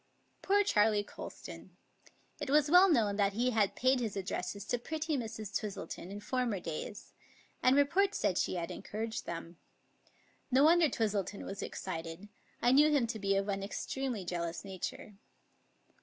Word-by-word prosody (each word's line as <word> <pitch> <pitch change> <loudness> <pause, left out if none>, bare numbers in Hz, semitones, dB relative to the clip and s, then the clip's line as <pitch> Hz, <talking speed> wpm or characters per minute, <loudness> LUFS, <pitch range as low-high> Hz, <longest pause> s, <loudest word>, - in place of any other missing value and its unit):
Poor 405 +1 +3
Charley 210 - +3
Colston! - - -10 0.6
It - - -4
was 295 +1 +4
well 365 +2 +8
known 215 - +2
that 200 -1 +2
he 245 +4 +1
had 215 -4 +2
paid 260 +1 +3
his 225 -4 -2
addresses 195 +1 -4
to 245 - -1
pretty 315 +4 -2
Mrs. 220 -4 -5
Twistleton 195 -4 -4
in 200 +1 -6
former 235 -1 -1
days, 175 +5 -6 0.5
and 255 +1 +5
report 370 +8 +3
said 180 - +1
she - - 0
had 170 -1 -3
encouraged 220 +1 -5
them. 170 0 -6 0.9
No 265 +2 +4
wonder 330 0 +6
Twistleton 205 -4 -2
was 195 - -6
excited. 165 +2 -6 0.3
I 240 - +5
knew 295 +3 +6
him 285 -5 +3
to 225 -1 -4
be 195 -1 +1
of 195 +1 0
an 195 -1 -1
extremely 230 +1 -3
jealous 170 0 -3
nature. 195 +1 -6
215 Hz, 155 wpm, -33 LUFS, 195-265 Hz, 0.9 s, well